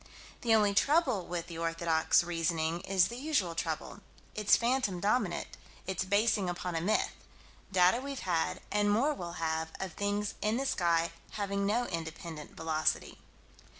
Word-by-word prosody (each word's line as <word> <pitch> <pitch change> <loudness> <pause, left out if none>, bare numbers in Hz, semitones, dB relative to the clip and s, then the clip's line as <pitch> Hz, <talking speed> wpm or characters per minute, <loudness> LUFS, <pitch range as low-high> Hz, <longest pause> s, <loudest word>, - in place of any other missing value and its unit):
The 230 -2 +4
only 205 -2 +3
trouble 260 - +2
with 170 -1 -3
the 170 -1 -8
orthodox 165 0 +2
reasoning 165 -1 -1
is 190 -2 +2
the 240 - -6
usual 255 - 0
trouble 165 +3 -3 0.3
its 210 -1 +4
phantom 235 -6 0
dominant 200 -3 +1 0.4
its 190 -1 -2
basing 205 -1 +2
upon 175 0 -3
a 165 - -1
myth 205 +6 +1 0.6
data 185 +5 +4
we've 275 -1 -5
had, 170 -3 -1
and 205 0 +2
more 250 +9 +3
we'll 175 -10 -6
have, 160 -1 -2
of 190 -3 -4
things 205 0 -1
in 215 +2 +1
the 270 - -1
sky 170 -7 +1 0.2
having 200 -1 -1
no 235 +4 +1
independent 160 -3 -6
velocity. 160 -1 -1
185 Hz, 150 wpm, -31 LUFS, 165-215 Hz, 0.6 s, The